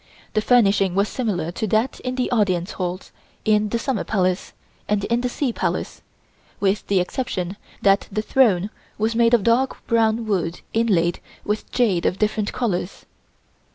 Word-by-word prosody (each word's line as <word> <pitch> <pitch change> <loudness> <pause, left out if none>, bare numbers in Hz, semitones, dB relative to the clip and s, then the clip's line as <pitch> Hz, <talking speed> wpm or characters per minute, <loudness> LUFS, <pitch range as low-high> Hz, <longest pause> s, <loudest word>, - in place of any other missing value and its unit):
The 215 - +2
furnishing 200 -6 +3
was 200 +2 +2
similar 195 -10 -2
to 220 +5 -3
that 220 +5 0
in 255 0 -4
the 255 -1 -1
Audience 185 -6 +1
Halls 180 0 -4 0.3
in 215 -1 +3
the 235 - 0
Summer 245 -1 -1
Palace 185 -3 0 0.4
and 205 -1 0
in 235 +3 0
the 250 - -1
Sea 250 -1 -1
Palace, - - -3 0.6
with 200 +1 0
the 195 -2 +3
exception 180 -2 -2 0.3
that 195 0 +4
the 215 +2 -1
throne 215 -6 +3 0.3
was 220 +2 0
made 230 +1 +4
of 220 - 0
dark 245 +5 +1
brown 225 0 +2
wood 180 -5 -1
inlaid 190 -7 +2 0.3
with 210 +1 -3
jade 205 -9 +2
of 180 - -1
different 215 0 0
colors. 200 -6 -3
215 Hz, 160 wpm, -22 LUFS, 190-230 Hz, 0.6 s, that